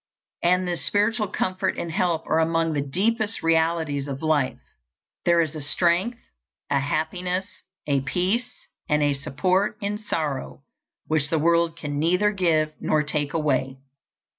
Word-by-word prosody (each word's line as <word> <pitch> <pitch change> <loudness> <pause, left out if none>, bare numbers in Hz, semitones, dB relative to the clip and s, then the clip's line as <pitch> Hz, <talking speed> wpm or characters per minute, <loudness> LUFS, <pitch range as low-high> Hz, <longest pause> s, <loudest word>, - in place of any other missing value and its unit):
And 180 +1 +2
this 170 -6 -2
spiritual 210 +1 +1
comfort 185 0 -1
and 170 - -3
help 165 -1 0
are 160 - +2
among 165 0 +1
the 145 - 0
deepest 215 - 0
realities 160 -3 +1
of 140 +1 -5
life. 150 -4 +1 0.7
There 170 -1 +5
is 160 -2 -1
a 155 - -6
strength, 175 - +1 0.5
a 140 - +3
happiness, 180 +6 -2 0.2
a 140 -2 +1
peace 195 - -1 0.2
and 150 -1 +3
a 145 -1 +3
support 180 +8 0
in 205 0 -2
sorrow 150 -10 -3 0.4
which 155 -2 +1
the 165 - +1
world 170 +1 +2
can 145 -3 -4
neither 180 +6 +3
give 160 -6 +1
nor 155 -1 +2
take 145 0 -2
away. 135 -4 0
165 Hz, 145 wpm, -24 LUFS, 150-185 Hz, 0.7 s, There